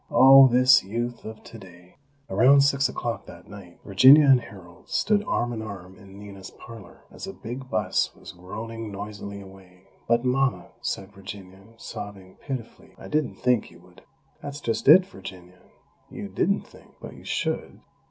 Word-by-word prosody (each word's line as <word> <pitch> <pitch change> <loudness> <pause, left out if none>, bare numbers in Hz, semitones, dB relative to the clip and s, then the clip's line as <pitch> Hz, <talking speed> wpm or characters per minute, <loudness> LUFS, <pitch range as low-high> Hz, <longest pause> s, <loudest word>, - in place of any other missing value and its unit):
Oh, 135 0 +8
this 125 +1 +5
Youth 120 +5 -5
of 110 0 -9
today!" 90 -5 -14 0.3
Around 130 +8 +5
six 140 0 +2
o'clock 120 -1 -5
that 85 +1 -13
night, 100 -4 -13
Virginia 130 +10 +7
and 135 -3 +5
Harold 90 -6 -15
stood 210 -1 +1
arm 120 -8 -1
in 110 - -5
arm 95 -4 -9
in 95 -1 -15
Nina's 100 -2 -11
parlor, 110 -7 -14
as - - -9
a - - -7
big 130 +3 -8
bus - - 0
was - - -12
groaning 110 +5 -8
noisily 100 0 -8
away. 95 -1 -16 0.2
"But, 120 +2 +1
Mama," 135 +1 0
said 95 +1 -5
Virginia, 95 0 -11
sobbing 100 -4 -9
pitifully, 130 -5 -8
"I - - -11
didn't 150 -3 -1
think 125 -3 0
you 85 - -17
would 90 0 -20 0.2
" - - -38
"That's 145 0 -7
just 115 -4 -3
it, 180 +6 +8
Virginia, 90 - -12 0.5
you - - -8
didn't - - 0
think!! - - -20
But - - -10
you - - -15
_should! - - -4
110 Hz, 165 wpm, -25 LUFS, 95-125 Hz, 0.5 s, Oh